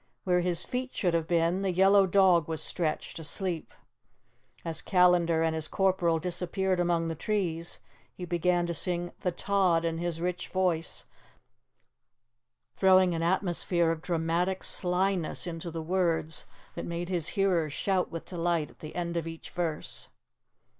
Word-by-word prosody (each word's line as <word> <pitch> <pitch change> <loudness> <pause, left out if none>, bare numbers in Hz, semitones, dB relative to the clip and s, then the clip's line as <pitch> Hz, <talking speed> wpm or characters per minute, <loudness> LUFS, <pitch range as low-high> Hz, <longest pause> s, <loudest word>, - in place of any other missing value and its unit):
Where 180 -1 +2
his 175 0 0
feet 255 +1 -4
should 175 -3 +1
have 165 -1 0
been, 170 +2 +2
the 195 -1 0
yellow 195 +2 +5
dog 180 -4 +4
was 160 -1 -3
stretched, 165 -1 -2
asleep. 170 +1 -3 0.9
As 165 -1 -2
Callandar 175 -3 +3
and 160 0 +1
his 160 -1 -2
corporal 185 -4 +2
disappeared 180 +2 -1
among 170 -1 +1
the 165 - -2
trees, 170 -2 -2 0.4
he 180 - -6
began 175 +1 +1
to 170 - -2
sing 175 +2 -1
'The 180 - -1
Tod' 180 -3 +2
in 165 0 -1
his 170 -1 -2
rich 180 +1 -2
voice, 180 -4 0 1.7
throwing 185 -2 +5
an 165 - -2
atmosphere 175 -1 +1
of 165 -1 -4
dramatic 175 +2 -1
slyness 180 -2 0
into 170 -1 -5
the 165 -1 -5
words 165 -2 -1 0.3
that - - -5
made 170 +1 -4
his 175 -4 -1
hearers 180 -6 +2
shout 185 +4 0
with 165 - -6
delight 170 -3 -1
at - - -24
the 155 - -9
end 170 -1 -2
of 165 -1 -2
each 165 0 -8
verse. 165 -4 -4
175 Hz, 155 wpm, -29 LUFS, 165-185 Hz, 1.7 s, yellow